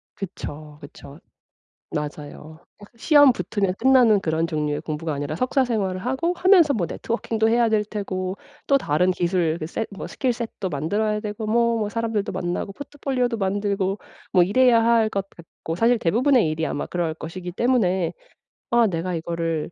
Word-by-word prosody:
그쵸. 155 Hz, -6 st, -8 dB
그쵸. 145 Hz, 0 st, -12 dB, 0.8 s
맞아요. 150 Hz, +1 st, -6 dB, 0.2 s
딱 205 Hz, -, -14 dB
시험 290 Hz, +2 st, +6 dB
붙으면 195 Hz, -5 st, -2 dB
끝나는 250 Hz, -5 st, +5 dB
그런 160 Hz, -2 st, -1 dB
종류의 150 Hz, -2 st, -2 dB
공부가 155 Hz, 0 st, -4 dB
아니라 145 Hz, +2 st, -3 dB
석사 255 Hz, -, +1 dB
생활을 200 Hz, -7 st, -1 dB
하고 265 Hz, +8 st, 0 dB
하면서 355 Hz, -5 st, +5 dB
뭐 200 Hz, -9 st, 0 dB
networking도 225 Hz, -1 st, -1 dB
해야 235 Hz, 0 st, +3 dB
될 215 Hz, -1 st, +1 dB
테고 190 Hz, -3 st, -4 dB, 0.3 s
또 275 Hz, -1 st, +3 dB
다른 180 Hz, -, +1 dB
기술 175 Hz, -2 st, 0 dB
그 155 Hz, -, -4 dB
set 220 Hz, +7 st, -4 dB
뭐 -, -, -6 dB
skill 260 Hz, -3 st, -1 dB
set도 225 Hz, -5 st, -5 dB
만들어야 205 Hz, +8 st, -1 dB
되고 210 Hz, +1 st, -5 dB
뭐, 235 Hz, +1 st, +2 dB
뭐 210 Hz, -2 st, -1 dB
사람들도 225 Hz, -2 st, -2 dB
만나고 180 Hz, +1 st, -3 dB
포트폴리오도 260 Hz, -3 st, -2 dB
만들고 200 Hz, 0 st, -1 dB, 0.3 s
뭐 180 Hz, -, +5 dB
이래야 230 Hz, +4 st, +4 dB
할 230 Hz, -1 st, +3 dB
것 195 Hz, -2 st, -3 dB
같고 165 Hz, -1 st, -8 dB
사실 230 Hz, +4 st, +3 dB
대부분의 235 Hz, -, +3 dB
일이 160 Hz, +1 st, -2 dB
아마 145 Hz, -, -3 dB
그럴 170 Hz, -3 st, -2 dB
것이기 175 Hz, +3 st, -7 dB
때문에 190 Hz, -4 st, +1 dB, 0.6 s
아 240 Hz, -1 st, +4 dB
내가 175 Hz, 0 st, -2 dB
이거를 165 Hz, -1 st, -3 dB
200 Hz, 395 characters per minute, -23 LUFS, 165-235 Hz, 0.8 s, 시험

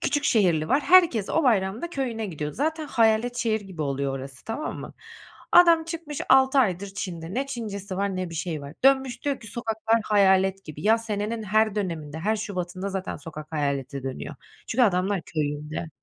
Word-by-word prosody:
küçük 290 Hz, 0 st, 0 dB
şehirli 170 Hz, -8 st, +2 dB
var, 280 Hz, -, +3 dB
herkes 305 Hz, -, +5 dB
o 325 Hz, -, +1 dB
bayramda 225 Hz, -, +1 dB
köyüne 240 Hz, -7 st, -3 dB
gidiyor. 150 Hz, -5 st, -5 dB
Zaten 310 Hz, +2 st, -2 dB
hayalet 230 Hz, 0 st, +2 dB
şehir 225 Hz, -3 st, 0 dB
gibi 190 Hz, -5 st, -6 dB
oluyor 140 Hz, -1 st, -1 dB
orası, 135 Hz, 0 st, -9 dB
tamam 255 Hz, +8 st, -4 dB
mı? -, -, -9 dB, 0.6 s
Adam 335 Hz, -2 st, +7 dB
çıkmış 330 Hz, -3 st, -6 dB
6 265 Hz, +1 st, +5 dB
aydır 200 Hz, -5 st, +2 dB
Çin'de, 175 Hz, -3 st, -5 dB
ne 270 Hz, +2 st, -1 dB
Çincesi 200 Hz, -7 st, -5 dB
var 200 Hz, -1 st, -1 dB
ne 185 Hz, -2 st, -3 dB
bir -, -, -8 dB
şeyi 160 Hz, -2 st, -3 dB
var. 140 Hz, +2 st, -9 dB
Dönmüş 265 Hz, -2 st, +3 dB
diyor 280 Hz, -2 st, -1 dB
ki, 220 Hz, -, -12 dB
"Sokaklar 225 Hz, 0 st, 0 dB
hayalet 195 Hz, -2 st, +3 dB
gibi." 150 Hz, -1 st, -9 dB
Ya, 225 Hz, +2 st, +4 dB
senenin 220 Hz, 0 st, -3 dB
her 215 Hz, +1 st, +2 dB
döneminde, 160 Hz, -6 st, -3 dB
her 215 Hz, +6 st, 0 dB
şubatında 185 Hz, -2 st, -4 dB
zaten 190 Hz, -1 st, -4 dB
sokak 155 Hz, -1 st, -10 dB
hayalete 140 Hz, -2 st, -2 dB
dönüyor. 135 Hz, +3 st, -5 dB, 0.3 s
Çünkü 250 Hz, +3 st, +2 dB
adamlar 190 Hz, -3 st, +2 dB
köyünde. 150 Hz, +1 st, -3 dB
205 Hz, 175 wpm, -25 LUFS, 165-240 Hz, 0.6 s, Adam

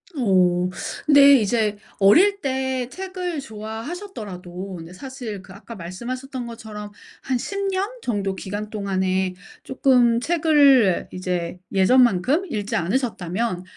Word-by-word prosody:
오 185 Hz, -6 st, +2 dB, 0.4 s
근데 285 Hz, -1 st, +8 dB
이제 215 Hz, -1 st, 0 dB, 0.2 s
어릴 365 Hz, -, +5 dB
때 260 Hz, -2 st, -1 dB
책을 365 Hz, -1 st, -5 dB
좋아하셨더라도 215 Hz, -, -7 dB
근데 170 Hz, +1 st, -10 dB
사실 245 Hz, -2 st, -7 dB
그 185 Hz, 0 st, -14 dB
아까 225 Hz, +4 st, -11 dB
말씀하셨던 245 Hz, +8 st, -6 dB
것처럼 220 Hz, -3 st, -8 dB, 0.3 s
한 260 Hz, -2 st, -1 dB
10 395 Hz, +9 st, -4 dB
년 385 Hz, +2 st, -1 dB
정도 200 Hz, -, -2 dB
기간 205 Hz, +2 st, -5 dB
동안에 190 Hz, -3 st, -1 dB, 0.3 s
쪼끔 250 Hz, -3 st, +3 dB
책을 285 Hz, -, +4 dB
이제 180 Hz, -1 st, -3 dB
예전만큼 245 Hz, -, +3 dB
읽지 205 Hz, -1 st, -2 dB
않으셨다면 190 Hz, -2 st, -1 dB
225 Hz, 255 characters per minute, -22 LUFS, 190-265 Hz, 0.4 s, 근데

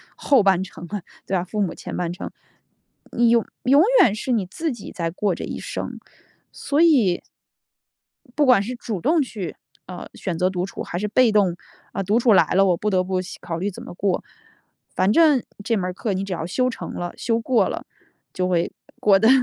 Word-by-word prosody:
后 275 Hz, -5 st, +3 dB
半 190 Hz, -2 st, +3 dB
程 175 Hz, -2 st, -10 dB
了， 205 Hz, +2 st, -4 dB, 0.3 s
对 195 Hz, -, 0 dB
吧， 175 Hz, -, -1 dB
父 210 Hz, +4 st, -5 dB
母 190 Hz, -, 0 dB
前 -, -, -7 dB
半 175 Hz, -1 st, -2 dB
程。 -, -, -7 dB, 0.8 s
你 235 Hz, 0 st, +3 dB
永 230 Hz, -1 st, +4 dB, 0.2 s
永 280 Hz, +5 st, +6 dB, 0.2 s
远 210 Hz, -, +4 dB
是 235 Hz, +4 st, -3 dB
你 220 Hz, -6 st, +1 dB
自 315 Hz, -, -3 dB
己 235 Hz, -4 st, -8 dB
在 165 Hz, -2 st, -2 dB
过 190 Hz, +2 st, 0 dB
这 -, -, -6 dB
一 -, -, -5 dB
生， -, -, -5 dB, 0.5 s
所 290 Hz, +2 st, 0 dB
以 250 Hz, -, +4 dB, 1.2 s
不 295 Hz, -1 st, +3 dB
管 250 Hz, -6 st, +6 dB
是 240 Hz, +5 st, -4 dB
主 225 Hz, -5 st, -4 dB
动 320 Hz, -, +3 dB
去， 210 Hz, -, -6 dB, 0.3 s
呃， 180 Hz, -1 st, -8 dB
选 175 Hz, -4 st, -4 dB
择 180 Hz, -, +3 dB
独 180 Hz, -1 st, -2 dB
处， -, -, -6 dB
还 175 Hz, -, -5 dB
是 210 Hz, -, -1 dB
被 235 Hz, +3 st, +4 dB
动， 195 Hz, -5 st, +3 dB, 0.4 s
呃， 195 Hz, -, -2 dB
独 210 Hz, +5 st, +2 dB
处 240 Hz, -1 st, +4 dB
来 190 Hz, -, +6 dB
了， 195 Hz, +1 st, +5 dB
我 180 Hz, -3 st, +3 dB
不 210 Hz, -, -2 dB
得 185 Hz, -2 st, +2 dB
不 185 Hz, 0 st, -1 dB
洗 185 Hz, -, -8 dB
考 165 Hz, -1 st, -4 dB
虑 195 Hz, +4 st, -1 dB
怎 185 Hz, -, -10 dB
么 -, -, -9 dB
过。 190 Hz, 0 st, 0 dB, 0.7 s
反 185 Hz, +2 st, +2 dB
正 300 Hz, -3 st, +5 dB, 0.2 s
这 230 Hz, +1 st, +1 dB
门 190 Hz, -, -1 dB
儿 180 Hz, -, -3 dB
课 210 Hz, +2 st, -2 dB
你 190 Hz, +1 st, -2 dB
只 195 Hz, -, -6 dB
要 165 Hz, -2 st, -3 dB
修 255 Hz, +8 st, 0 dB
成 -, -, -7 dB
了， 175 Hz, 0 st, -4 dB
修 230 Hz, -1 st, 0 dB
过 240 Hz, +1 st, +2 dB
了， -, -, -5 dB, 0.5 s
就 185 Hz, 0 st, -1 dB
会 175 Hz, -2 st, 0 dB, 0.3 s
过 200 Hz, -2 st, +5 dB
得 220 Hz, +3 st, +4 dB
200 Hz, 230 characters per minute, -22 LUFS, 180-235 Hz, 1.2 s, 永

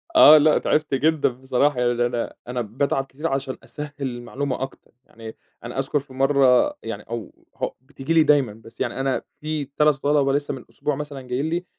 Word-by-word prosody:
آه 155 Hz, -, +10 dB
لأ 150 Hz, 0 st, +5 dB
تعبت 150 Hz, -2 st, 0 dB
جدًا 155 Hz, +2 st, +2 dB
بصراحة 130 Hz, +2 st, 0 dB
يعني 120 Hz, 0 st, +2 dB
أنا 120 Hz, -1 st, -3 dB
أنا 125 Hz, 0 st, -2 dB
باتعب 135 Hz, +5 st, -1 dB
كتير 150 Hz, +5 st, -5 dB
عشان 135 Hz, -2 st, -2 dB
أسهِّل 150 Hz, -1 st, -7 dB
المعلومة 130 Hz, +1 st, -3 dB
أكتر. 135 Hz, 0 st, -7 dB
يعني 110 Hz, -1 st, -11 dB, 0.3 s
أنا -, -, -5 dB
أذكر 145 Hz, -, 0 dB
في 135 Hz, -1 st, -14 dB
مرّة 135 Hz, -, +4 dB
يعني -, -, -5 dB
أو 115 Hz, -4 st, -6 dB, 0.2 s
هو -, -, -3 dB
بتيجي 140 Hz, +3 st, -4 dB
لي 160 Hz, -, +6 dB
دايمّا 140 Hz, -8 st, +3 dB
بس 115 Hz, +1 st, -14 dB
يعني -, -, -2 dB
أنا 135 Hz, -1 st, 0 dB, 0.2 s
في 155 Hz, -1 st, -2 dB
3 150 Hz, +2 st, +2 dB
طَلَبة 145 Hz, -1 st, +3 dB
لسه 145 Hz, 0 st, -1 dB
من 130 Hz, -, -8 dB
اسبوع 150 Hz, -2 st, -2 dB
مثلًا 145 Hz, -1 st, -6 dB
جايين 130 Hz, +3 st, -2 dB
لي 175 Hz, +2 st, -2 dB
135 Hz, 190 wpm, -23 LUFS, 125-150 Hz, 0.3 s, آه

